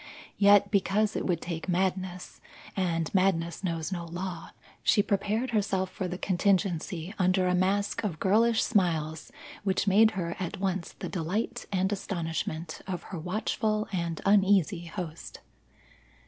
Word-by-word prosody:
Yet 205 0 +6
because 205 +1 +2
it - - -1
would 175 -3 0
take 170 +1 -5
madness, 185 0 -2 0.3
and 165 -4 -1
madness 185 -3 +1
knows 165 -3 -2
no 175 -2 -3
law, 175 0 -5 0.3
she 205 - +4
prepared 210 +5 0
herself 195 -4 0
for 185 - -3
the 180 0 -4
contingency 185 -2 0
under 185 0 +3
a 180 - +2
mask 195 +4 +1
of 175 -7 -2
girlish 220 +4 +3
smiles 160 -7 0 0.3
which 190 -1 +1
made 210 +3 +6
her 170 -2 -2
at 180 -3 -3
once 190 -2 -2
the - - -6
delight 185 +5 -3
and 190 0 +1
astonishment 165 -4 -3
of 180 -3 -4
her 175 - -3
watchful 215 +4 -1
and 170 -3 -2
uneasy 195 -3 +3
host. 170 -2 -7
185 Hz, 140 wpm, -28 LUFS, 170-200 Hz, 0.3 s, Yet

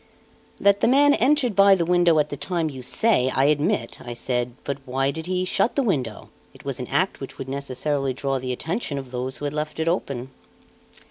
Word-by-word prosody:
"That 200 0 +4
the - - +3
man 285 +3 +5
entered 260 -4 +2
by 195 0 +7
the 170 -3 0
window 175 -1 +4
at 150 0 +2
the - - -4
time 165 +1 -2
you 130 -2 -8
say, 130 - +2
I 135 - +3
admit," 150 +8 +1
I 120 - -6
said; 120 0 -2
"but 140 0 -3
why 135 +1 0
did 160 +3 -5
he 185 0 0
shut 205 - +1
the 280 - +2
window? 130 - -2 0.2
It - - -16
was - - -3
an - - -4
act - - 0
which - - -8
would 135 - -6
necessarily 140 +1 -2
draw 135 0 -1
the 130 0 -4
attention 160 - -3
of 135 -2 -7
those 130 0 -3
who 145 - -6
had 145 - -2
left 150 +1 -4
it 160 - -1
open." 135 -7 -2
150 Hz, 215 wpm, -23 LUFS, 130-185 Hz, 0.2 s, by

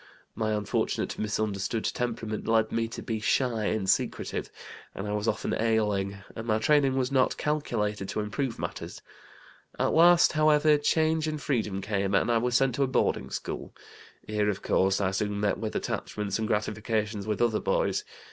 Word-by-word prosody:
My 110 -1 -1
unfortunate, 105 -1 -1
misunderstood 105 0 -1
temperament 115 -3 -3
led 110 -1 +2
me 115 0 0
to 115 - -7
be 110 -1 -2
shy 115 0 +1
and 105 -3 -1
secretive, - - 0 0.5
and 95 - -4
I - - -2
was 105 +1 -2
often 110 - -1
ailing, 105 -3 0 0.2
and 110 +1 -6
my 110 -1 +2
training 135 +3 +3
was 130 0 0
not 130 -2 +2
calculated 105 -10 -1
to - - -2
improve 115 +4 -2
matters. - - -6 0.7
At - - +1
last, 175 +1 +6
however, 155 -1 +4
change 160 +1 +2
and 155 -1 -2
freedom 110 -9 -1
came, 100 -1 0
and 120 - +2
I 115 - +3
was 120 +1 0
sent 135 0 +3
to 140 - +2
a - - +1
boarding 130 - 0
school. - - -5 0.5
Here, 105 -1 0
of 100 -1 -3
course, 95 +1 +2
I 95 -2 +1
soon 105 +1 -1
met 105 -1 0
with 110 -1 -4
attachments 105 -1 -3
and 110 - -1
gratifications 105 0 -1
with 105 - -1
other 115 -2 +2
boys. - - 0
110 Hz, 175 wpm, -28 LUFS, 105-130 Hz, 0.7 s, last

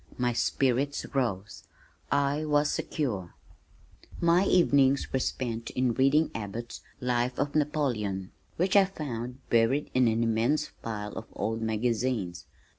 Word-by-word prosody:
My 125 -1 +1
spirits 135 +3 0
rose. 105 -7 -2 0.5
I 140 +2 +1
was 150 -1 +2
secure. 105 - -3 0.8
My 170 +3 +4
evenings 140 -7 +3
were 130 - +2
spent 115 -3 -3
in 125 -2 0
reading 135 +5 +3
Abbott's 115 +2 -6 0.2
Life 125 0 0
of 145 0 -1
Napoleon 120 -11 -1 0.3
which 185 +3 +1
I 200 -1 +7
found 125 -8 -6
buried 120 +5 +2
in 130 -1 +4
an 115 +1 +2
immense 115 +7 +1
pile 105 -2 -5
of 110 - -7
old 110 +1 -2
magazines. 110 -5 -1
125 Hz, 125 wpm, -28 LUFS, 115-145 Hz, 0.8 s, I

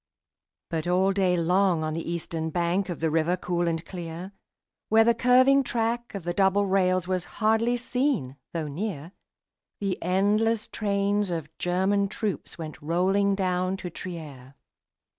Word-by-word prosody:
But 165 0 -2
all 185 +2 +3
day 185 -2 +2
long 180 0 +2
on 155 0 -2
the 165 +1 -4
eastern 165 -1 -3
bank 175 +4 0
Of 175 - -5
the 160 -1 +1
river 165 +3 +1
cool 175 -1 -1
and 165 0 -2
clear, 175 +1 -7 0.6
Where 225 +1 +6
the 235 +1 +4
curving 255 +3 +5
track 235 -1 -2
of 195 - -5
the 175 +1 -2
double 195 +2 +3
rails 185 -2 +2
Was 185 -2 -1
hardly 225 +2 +2
seen 250 - -1 0.2
though 165 -3 -3
near, 165 0 -4 0.7
The 195 -2 -2
endless 210 +5 +1
trains 200 -1 0
of 160 -3 -4
German 190 +3 +1
troops 210 -1 -4
Went 155 -2 -7
rolling 190 +5 +2
down 185 0 0
to 180 -2 -6
Trier. 145 -8 -8
185 Hz, 150 wpm, -26 LUFS, 170-205 Hz, 0.7 s, Where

